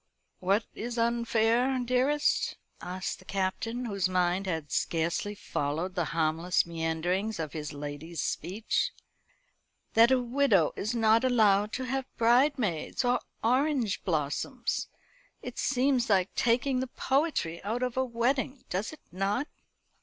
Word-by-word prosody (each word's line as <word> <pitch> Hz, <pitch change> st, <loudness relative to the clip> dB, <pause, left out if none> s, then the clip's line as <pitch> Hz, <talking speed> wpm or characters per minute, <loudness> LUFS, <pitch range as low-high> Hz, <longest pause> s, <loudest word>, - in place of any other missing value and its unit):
"What 195 Hz, +4 st, +1 dB
is 240 Hz, +1 st, -5 dB
unfair, 235 Hz, +2 st, +2 dB
dearest?" 255 Hz, +4 st, +1 dB, 0.2 s
asked 185 Hz, +1 st, -4 dB
the 185 Hz, -, -17 dB
Captain, 200 Hz, +6 st, -2 dB
whose 200 Hz, -4 st, 0 dB
mind 180 Hz, +1 st, +1 dB
had 160 Hz, -5 st, -3 dB
scarcely 170 Hz, +5 st, -1 dB
followed 165 Hz, -1 st, -2 dB
the 175 Hz, -3 st, 0 dB
harmless 165 Hz, +3 st, +1 dB
meanderings 170 Hz, +5 st, -1 dB
of 155 Hz, -3 st, -4 dB
his 150 Hz, -2 st, -5 dB
lady's 145 Hz, +3 st, -6 dB
speech. 200 Hz, +10 st, -1 dB, 1.0 s
"That 230 Hz, +1 st, +7 dB
a 260 Hz, -1 st, +4 dB
widow 245 Hz, -, +2 dB
is 215 Hz, +4 st, -2 dB
not 225 Hz, 0 st, +4 dB
allowed 210 Hz, -5 st, +4 dB
to 260 Hz, -, -2 dB
have 265 Hz, +1 st, -2 dB
bridesmaids 240 Hz, -, +2 dB
or 245 Hz, 0 st, +3 dB, 0.2 s
orange 255 Hz, -3 st, +1 dB
blossoms. 180 Hz, -, -1 dB, 0.6 s
It -, -, -6 dB
seems 260 Hz, -3 st, +2 dB
like 190 Hz, -2 st, +2 dB
taking 255 Hz, +3 st, +2 dB
the 260 Hz, -, -2 dB
poetry 265 Hz, -, -1 dB
out 225 Hz, +5 st, -2 dB
of 250 Hz, -1 st, -2 dB
a 260 Hz, -, +2 dB
wedding, 260 Hz, +3 st, -1 dB
does 190 Hz, +4 st, -1 dB
it 310 Hz, -, -13 dB
not?" 200 Hz, -, -1 dB
220 Hz, 130 wpm, -29 LUFS, 180-250 Hz, 1.0 s, That